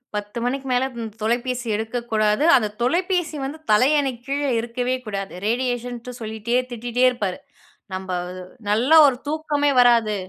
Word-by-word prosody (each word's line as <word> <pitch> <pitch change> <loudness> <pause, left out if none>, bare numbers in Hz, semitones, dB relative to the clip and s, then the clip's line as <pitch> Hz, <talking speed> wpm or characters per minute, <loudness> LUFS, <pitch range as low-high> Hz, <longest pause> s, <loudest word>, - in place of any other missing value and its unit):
10 205 +3 -4
மணிக்கு 270 +2 -2
மேல, 250 +1 +2 0.2
ம் 225 -1 -4
தொலைபேசி 240 +2 -1
எடுக்கக்கூடாது. 220 +1 0
அந்த 220 -5 +3
தொலைபேசி 350 +5 0
வந்து 285 +4 -5
தலையணைக்கு 260 +2 +3
கீழ, 280 +1 -1 0.2
இருக்கவே 245 +2 -2
கூடாது. 195 -2 -5
ரேடியேஷன்ட்டு 245 +1 -2
சொல்லிட்டே 220 +2 -3 0.2
திட்டிட்டே 240 +1 -2
இருப்பாரு. 205 -7 -3 0.5
நம்ப 185 0 -5 0.6
நல்லா 245 +10 +4
ஒரு 260 -3 +1
தூக்கமே 295 -1 0
வராது. 235 -3 +4
245 Hz, 130 wpm, -22 LUFS, 220-265 Hz, 0.6 s, நல்லா